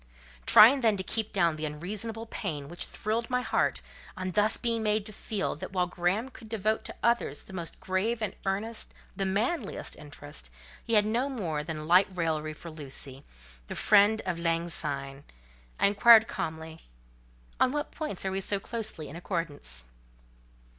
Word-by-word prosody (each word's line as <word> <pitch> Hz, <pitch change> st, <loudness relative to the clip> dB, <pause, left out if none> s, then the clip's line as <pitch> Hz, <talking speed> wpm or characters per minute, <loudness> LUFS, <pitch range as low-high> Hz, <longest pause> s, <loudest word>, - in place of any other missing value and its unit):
Trying, 250 Hz, +6 st, +9 dB
then, 220 Hz, -4 st, +3 dB
to 190 Hz, -, -2 dB
keep 220 Hz, +2 st, -2 dB
down 170 Hz, -5 st, +2 dB
the 155 Hz, -, -3 dB
unreasonable 210 Hz, +9 st, -5 dB
pain 160 Hz, -11 st, -4 dB
which 175 Hz, -, -2 dB
thrilled 225 Hz, +2 st, -2 dB
my 250 Hz, 0 st, +1 dB
heart, -, -, +1 dB, 0.4 s
on 185 Hz, 0 st, -3 dB
thus 210 Hz, +4 st, +4 dB
being 230 Hz, -2 st, 0 dB
made 215 Hz, -1 st, +1 dB
to 215 Hz, -, -10 dB
feel 205 Hz, -1 st, -2 dB
that 175 Hz, -, -7 dB
while 180 Hz, -1 st, +2 dB
Graham 180 Hz, +7 st, -1 dB
could 230 Hz, -4 st, -13 dB
devote 220 Hz, 0 st, 0 dB
to -, -, -6 dB
others 235 Hz, -12 st, +1 dB
the -, -, -13 dB
most 170 Hz, -3 st, -6 dB
grave 205 Hz, +5 st, 0 dB
and 215 Hz, -4 st, -3 dB
earnest, 205 Hz, +4 st, -2 dB, 0.2 s
the 195 Hz, 0 st, -1 dB
manliest 215 Hz, -, -1 dB
interest, 145 Hz, -, -8 dB, 0.3 s
he 230 Hz, -, -3 dB
had 210 Hz, -1 st, +6 dB
no 240 Hz, +6 st, 0 dB
more 170 Hz, -, -2 dB
than 155 Hz, -1 st, -5 dB
light 180 Hz, +3 st, +6 dB
raillery 155 Hz, -3 st, -1 dB
for 170 Hz, +2 st, -9 dB
Lucy, 140 Hz, -2 st, -5 dB, 0.4 s
the -, -, -6 dB
friend 210 Hz, +1 st, +5 dB
of 175 Hz, -2 st, -2 dB
lang 170 Hz, 0 st, 0 dB
syne, 140 Hz, -3 st, -2 dB, 0.6 s
I -, -, +4 dB
inquired 220 Hz, +2 st, +7 dB
calmly,—"On -, -, -5 dB
what 295 Hz, +1 st, -3 dB
points 305 Hz, -, -5 dB
are 190 Hz, -, 0 dB
we 190 Hz, -, 0 dB
so 200 Hz, +1 st, -1 dB
closely 215 Hz, -8 st, -5 dB
in 140 Hz, -, -9 dB
accordance?" 150 Hz, -, -2 dB
190 Hz, 165 wpm, -29 LUFS, 155-220 Hz, 0.6 s, Trying